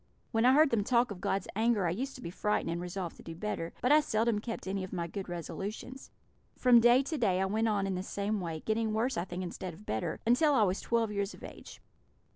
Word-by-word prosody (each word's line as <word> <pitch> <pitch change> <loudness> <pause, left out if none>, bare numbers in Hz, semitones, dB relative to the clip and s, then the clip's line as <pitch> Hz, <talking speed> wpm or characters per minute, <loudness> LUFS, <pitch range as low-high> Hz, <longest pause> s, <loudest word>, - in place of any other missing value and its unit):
When 225 0 +2
I 255 - +6
heard 305 +1 +5
them 220 -3 +2
talk 240 +1 +2
of 185 - -7
God's 195 -1 -1
anger 220 -3 +2
I 165 - +1
used 265 +9 -3
to 255 - -10
be 170 - -5
frightened, 210 -3 -1
and 170 +1 -3
resolved 180 -1 -5
to - - -12
do 165 - -8
better; 170 -3 -3
but 250 - +3
I 300 - +8
seldom 225 -5 +1
kept 230 +2 -6
any 190 0 -2
of 185 - -7
my 175 -3 -2
good 190 +2 -6
resolutions. 200 +9 -6 0.5
From 245 -2 +6
day 240 +3 +5
to 305 +1 -3
day 190 -6 +2
I 190 - +2
went 220 +4 0
on 205 -2 +1
in 195 - -1
the 180 - -2
same 200 +2 -2
way, 165 -3 -4
getting 220 0 0
worse, 235 +5 0
I 170 - -1
think, 180 0 -5
instead 180 -1 -6
of 210 - -16
better, 110 - -2
until 280 +6 +4
I 225 - +5
was 190 0 0
twelve 230 -2 0
years 200 0 -2
of - - -16
age. - - -11
210 Hz, 250 wpm, -31 LUFS, 185-235 Hz, 0.5 s, I